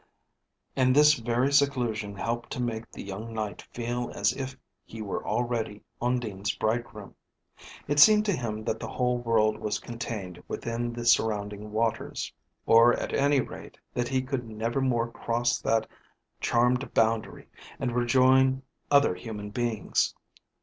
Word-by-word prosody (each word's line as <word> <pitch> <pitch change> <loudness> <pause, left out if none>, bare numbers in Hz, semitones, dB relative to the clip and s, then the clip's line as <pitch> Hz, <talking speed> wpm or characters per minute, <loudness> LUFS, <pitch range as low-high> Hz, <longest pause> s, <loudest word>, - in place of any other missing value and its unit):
And 130 -1 +3
this 150 +1 +7
very 120 +1 0
seclusion 120 -8 +1
helped 115 +4 -3
to - - -5
make 115 -2 -3
the - - -8
young 105 +4 -7
Knight 105 -4 -3
feel 120 0 -3
as 100 0 +2
if 130 -1 -5 0.3
he 115 - -11
were 105 -3 -4
already 115 -4 -2 0.2
Undine's 110 -5 -1
bridegroom. 110 -2 -3 0.7
It 145 +1 +1
seemed 210 +5 +8
to 205 - +2
him 110 -7 -3
that 110 - -2
the - - -5
whole 125 -1 0
world 110 -2 +2
was 105 - -1
contained 110 -6 -6
within 120 +1 -3
the 120 0 -6
surrounding 105 -2 +1
waters, 110 +1 -2 0.3
or 115 +1 +7
at - - -4
any 140 -1 +3
rate, - - -9 0.2
that 120 0 -1
he 130 0 0
could 130 -3 -4
never 115 +4 -2
more 120 -3 +1
cross 120 +1 -1
that 110 -1 +1 0.5
charmed 125 +3 +1
boundary, 110 0 +1 0.3
and 130 -2 -1
rejoin 130 +2 +4 0.3
other 140 -8 +5
human 105 +2 -7
beings. 120 -1 0
120 Hz, 145 wpm, -28 LUFS, 110-125 Hz, 0.7 s, seemed